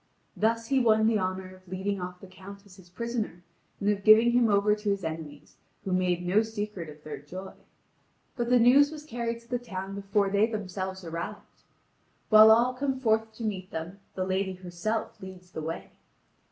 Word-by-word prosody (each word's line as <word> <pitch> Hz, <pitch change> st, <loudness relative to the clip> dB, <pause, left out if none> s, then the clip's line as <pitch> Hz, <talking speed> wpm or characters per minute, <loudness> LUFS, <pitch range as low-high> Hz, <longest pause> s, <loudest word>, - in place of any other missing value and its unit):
Thus 230 Hz, +1 st, 0 dB
he 270 Hz, -1 st, +3 dB
won 220 Hz, -3 st, +4 dB
the 220 Hz, -1 st, +3 dB
honour 185 Hz, 0 st, -3 dB
of 185 Hz, 0 st, -21 dB
leading 190 Hz, +2 st, -3 dB
off 180 Hz, 0 st, -7 dB
the -, -, -10 dB
Count 195 Hz, +2 st, -12 dB
as 195 Hz, -1 st, -17 dB
his 180 Hz, -2 st, -17 dB
prisoner, 220 Hz, -3 st, -4 dB, 0.4 s
and 200 Hz, -, -2 dB
of 205 Hz, -1 st, +1 dB
giving 220 Hz, +3 st, +7 dB
him 240 Hz, -1 st, +3 dB
over 205 Hz, +1 st, +4 dB
to 210 Hz, 0 st, -2 dB
his 200 Hz, -1 st, -1 dB
enemies, 160 Hz, -2 st, -7 dB, 0.3 s
who 190 Hz, -, -2 dB
make 180 Hz, -1 st, +1 dB
no 185 Hz, +5 st, +3 dB
secret 210 Hz, -6 st, -5 dB
of 150 Hz, 0 st, -13 dB
their 145 Hz, -2 st, -7 dB
joy. 185 Hz, +7 st, -9 dB, 0.8 s
But 240 Hz, -2 st, -2 dB
the 250 Hz, -, +6 dB
news 270 Hz, +5 st, +6 dB
was 300 Hz, -1 st, -9 dB
carried 235 Hz, -4 st, -3 dB
to 235 Hz, -, -23 dB
the 245 Hz, 0 st, -2 dB
town 195 Hz, -5 st, -6 dB
before 200 Hz, 0 st, 0 dB
they 205 Hz, +2 st, +3 dB
themselves 190 Hz, -3 st, -5 dB
arrived. 170 Hz, +5 st, -7 dB, 0.7 s
While 215 Hz, 0 st, +9 dB
all 235 Hz, +3 st, +5 dB
come 265 Hz, 0 st, -2 dB
forth 220 Hz, -2 st, +1 dB
to 230 Hz, -, -8 dB
meet 195 Hz, -4 st, -3 dB
them, 170 Hz, +5 st, -6 dB, 0.2 s
the 185 Hz, -, -1 dB
lady 190 Hz, 0 st, -1 dB
herself 185 Hz, +5 st, -4 dB
leads 185 Hz, -1 st, -11 dB
the 160 Hz, -, -5 dB
way. 160 Hz, +2 st, -5 dB
200 Hz, 195 wpm, -28 LUFS, 185-225 Hz, 0.8 s, While